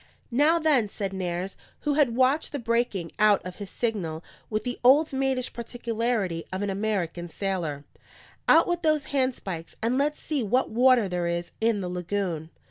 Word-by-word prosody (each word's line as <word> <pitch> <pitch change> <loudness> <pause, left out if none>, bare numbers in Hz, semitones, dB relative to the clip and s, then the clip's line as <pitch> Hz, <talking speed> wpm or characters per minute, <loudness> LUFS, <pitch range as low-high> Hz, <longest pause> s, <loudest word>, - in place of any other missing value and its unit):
"Now, 295 +7 +4
then," 295 -10 +3
said 195 -1 -4
Nares, 185 0 -3 0.3
who 295 - 0
had 280 -6 +3
watched 260 +5 +2
the - - -1
breaking 230 - -1
out 210 -1 +5
of 185 -1 -7
his 205 -2 -7
signal 180 -10 -2 0.3
with 215 -1 -1
the 245 +1 -4
old 280 +5 +5
maidish 265 -1 0
particularity 230 -6 -2
of 190 +2 -2
an 200 - -1
American 190 -4 -2
sailor, 165 -7 -3 0.6
"out 330 - +7
with 350 -1 -1
those 310 -4 +1
handspikes, 235 -11 -2
and 240 +4 +1
let's 295 +1 0
see 300 -4 -2
what 245 +4 +1
water 245 -1 +5
there 180 -1 -1
is 170 0 -2
in 225 -2 +2
the 180 - -3
lagoon." 180 -2 -3
220 Hz, 170 wpm, -26 LUFS, 185-260 Hz, 0.6 s, out